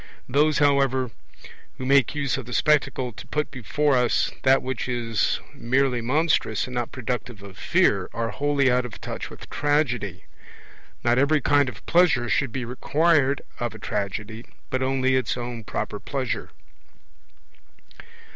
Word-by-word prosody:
Those, 150 +3 +3
however, 135 -3 +2 0.7
who 130 - -5
make 140 +1 +3
use 140 -4 0
of 135 -3 -6
the 125 - -6
Spectacle 140 -4 +2
to - - -11
put 150 0 -2
before 145 +2 0
us 125 -2 +2
that 135 0 +4
which 130 -1 -3
is 115 -3 0
merely 125 0 +1
monstrous 130 -4 +1
and 125 - -8
not 120 -2 -2
productive 125 -4 -4
of 100 -2 -11
fear, - - +2
are 115 0 -2
wholly 140 0 +2
out 125 0 +2
of 125 - -8
touch - - -6
with - - -11
Tragedy; 125 - 0 0.8
not 120 +1 +3
every 150 +3 +3
kind 145 0 +3
of 115 - -12
pleasure 170 -9 +3
should 140 0 +1
be 125 0 -3
required 145 +2 +2 0.2
of 120 -2 -3
a - - -7
tragedy, 105 +2 -4 0.3
but 130 - 0
only 130 0 +1
its 130 -1 0
own 120 -1 -5
proper 105 0 -4
pleasure. 130 -1 -3
130 Hz, 150 wpm, -24 LUFS, 120-140 Hz, 0.8 s, that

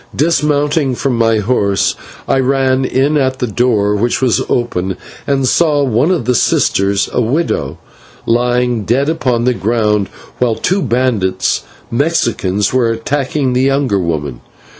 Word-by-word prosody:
Dismounting 150 -3 +1
from 130 0 -1
my 115 -1 +2
horse 100 -2 +1 0.3
I 135 - +2
ran 130 0 +1
in 140 +4 +1
at 130 -2 0
the 125 - -1
door, 110 -3 +1
which 120 +4 0
was 125 -3 +1
open, 95 -6 -1 0.3
and 135 -2 +1
saw 150 -1 +2
one 130 +4 +1
of 175 -10 0
the 125 - +2
sisters, 100 -3 +1
the - - -2
widow, 115 - -1 0.5
lying 120 -1 +1
dead 130 +8 +1
upon 125 -7 0
the 125 +1 +2
ground, 105 -1 0 0.3
while 120 -3 +1
two 190 - 0
bandits, 115 - 0 0.3
Mexicans, 115 - 0
were 125 -3 +2
attacking 130 +3 -1
the 125 - +1
younger 135 -6 +1
woman. 75 -8 -3
125 Hz, 140 wpm, -14 LUFS, 105-135 Hz, 0.5 s, my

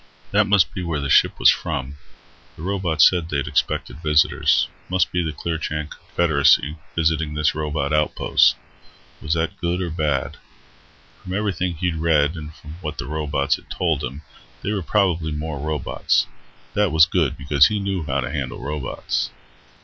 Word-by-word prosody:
That - - +3
must 100 -2 +3
be 95 - -4
where 85 -4 -2
the 70 -1 -2
ship - - +4
was - - +7
from. 70 +2 -4 0.6
The 80 - -10
robot 90 -6 +1
said 85 -3 +4
they'd 70 -2 -1
expected 75 +1 -1
visitors. 75 -2 +3 0.2
Must 90 -2 +1
be 90 - 0
the 80 - -2
Clearchan 75 -1 -4
Confederacy 75 -2 +2 0.2
visiting 80 -2 0
this 75 0 +2
robot 75 -1 -2
outpost. 75 0 +3 0.7
Was 75 +2 -1
that 80 0 -2
good 85 0 0
or 90 -3 -3
bad? 75 -5 -1 0.8
From 90 - -7
everything 95 -4 -1
he'd 85 0 -2
read, 80 -1 +2
and 80 -1 -7
from 75 +2 -11
what 75 -3 -5
the - - -4
robots 75 -1 -1
had - - -20
told 80 -5 -1
him, 70 +4 -6 0.4
they 105 - -1
were 100 - -1
probably 85 -4 +1
more 75 -1 -4
robots. 75 -1 0 0.5
That 105 -4 +2
was 80 0 +7
good, 85 -6 0
because 70 0 +4
he 105 - -2
knew 95 -3 -2
how 70 -1 -1
to 60 - -4
handle 65 -3 -4
robots. 70 -1 -3
80 Hz, 165 wpm, -22 LUFS, 75-85 Hz, 0.8 s, was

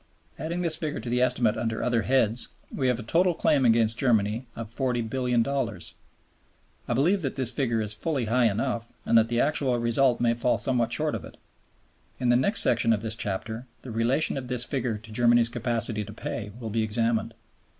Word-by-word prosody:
Adding 170 +3 -3
this 160 -2 0
figure 155 -3 -3
to 115 +2 -6
the 125 0 +1
estimate 120 -3 +2
under 115 -1 -2
other 120 -2 +1
heads, 120 -1 +2 0.3
we 130 - 0
have 125 -2 +1
a - - -5
total 175 +8 +2
claim 140 -4 +2
against 115 -1 +3
Germany 115 -1 +1
of 115 -1 -6
$40,000,000,000. 125 +2 -1 0.9
I - - 0
believe 175 +10 +2
that 135 -5 -3
this 130 -2 0
figure 120 -3 0
is 105 0 -3
fully 135 +1 -2
high 120 +3 +2
enough, 115 +2 -1
and - - +2
that 115 0 +5
the 120 0 0
actual 140 -4 +1
result 120 +2 +2
may 120 -1 +2
fall 120 +1 +1
somewhat 120 -3 0
short 150 +4 0
of - - -4
it. - - -12 0.8
In 125 - 0
the 120 - +5
next 200 - +4
section 115 -1 +3
of 110 -1 -2
this 110 -1 -2
chapter 110 +4 -4 0.2
the 130 - -7
relation 120 +7 +1
of 125 - -8
this 125 -1 0
figure 120 -3 -2
to 110 +1 -13
Germany's 120 +1 +4
capacity 115 -2 -2
to 105 - -10
pay 105 -1 -5
will 115 -3 -5
be 115 +1 0
examined. 115 +1 0
120 Hz, 195 wpm, -26 LUFS, 115-130 Hz, 0.9 s, that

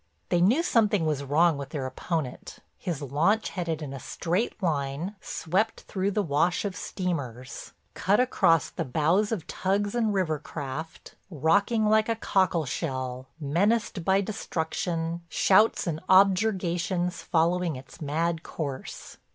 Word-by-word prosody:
They 175 -1 +2
knew 240 - +4
something 210 - +2
was 150 -3 0
wrong 150 +2 +3
with 140 - -6
their 145 -4 -4
opponent; 130 +1 -4 0.2
his 165 -5 -3
launch 165 - +1
headed 165 -4 -3
in 140 -2 -6
a 135 - -6
straight 180 - -2
line 150 +3 -1
swept 195 +7 -1
through 195 -1 -2
the 205 +1 0
wash 165 +4 +1
of 195 -2 -3
steamers, 135 - -4 0.2
cut 200 +3 +2
across 170 - +3
the 165 - -3
bows 165 - +1
of 195 -9 -2
tugs 200 +2 -1
and 230 -3 +1
river 175 -6 0
craft, 150 +2 -7 0.2
rocking 200 - +2
like 215 +1 +3
a 230 - +2
cockleshell, 135 - -1
menaced 185 +6 +1
by 190 +3 +3
destruction, 170 -4 -3
shouts 210 +7 +4
and 165 -3 -2
objurgations 185 -2 +2
following 170 0 +1
its 130 +4 -12
mad 160 +3 -1
course. 140 -6 -6
170 Hz, 135 wpm, -27 LUFS, 150-195 Hz, 0.2 s, knew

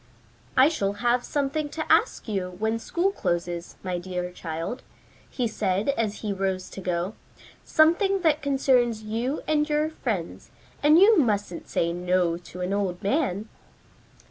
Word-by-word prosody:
"I 260 +2 +8
shall 200 -11 0
have 240 +3 +1
something 290 +1 -1
to 315 +1 -4
ask - - +2
you 185 -4 -3
when 220 +2 0
school 350 +10 0
closes, 175 - -3
my 180 -2 -2
dear 180 0 -4
child," 165 +7 -5 0.5
he 245 -3 -1
said 200 0 -1
as 225 -6 -1
he 210 -2 -2
rose 190 -1 -2
to 195 - -7
go. 180 +2 -2 0.5
"Something 370 +5 +3
that 310 -3 +2
concerns 255 -5 +2
you 230 +7 -2
and 300 0 +1
your 300 +1 +1
friends, 180 - -4 0.3
and 300 +2 +6
you 400 +2 +7
mustn't 205 - -1
say 170 0 0
'no' 180 -1 +1
to 180 +1 -10
an 180 +2 -1
old 190 -3 -2
man." 215 - 0
215 Hz, 150 wpm, -26 LUFS, 180-285 Hz, 0.5 s, I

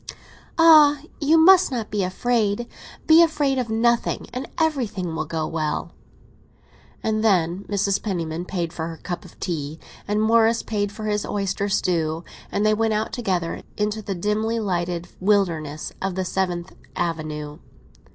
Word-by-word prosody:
"Ah! 305 -3 +7 0.2
you 310 +1 +4
must 365 +3 +7
not 235 -4 -3
be 210 - 0
afraid. 215 +3 0 0.4
Be 320 +1 +7
afraid 295 -5 +2
of 245 -3 -2
nothing, 235 +2 +1
and 255 +2 -5
everything 240 - -1
will 160 - -2
go 160 0 -2
well!" 155 -1 -2 1.1
And 215 0 0
then 185 -2 +2
Mrs. 200 -1 0
Penniman 170 -4 -3
paid 175 -3 -3
for 160 -1 -4
her 165 -1 -7
cup 175 +1 -6
of - - -16
tea, 155 -3 -4 0.3
and 210 +1 0
Morris 225 +1 +3
paid 205 -2 -2
for 215 +1 -7
his 210 -1 0
oyster 200 0 -2
stew, 165 -4 0 0.3
and 205 - 0
they 215 - +4
went 220 0 +1
out 215 +1 -2
together 185 -8 -2 0.2
into 210 +1 -1
the 200 -2 -4
dimly 215 +5 -1
lighted 175 -4 -2
wilderness 170 -7 0
of 190 -1 -2
the 185 0 -1
Seventh 180 -1 -2 0.2
Avenue. 155 -3 -3
200 Hz, 150 wpm, -23 LUFS, 170-225 Hz, 1.1 s, Ah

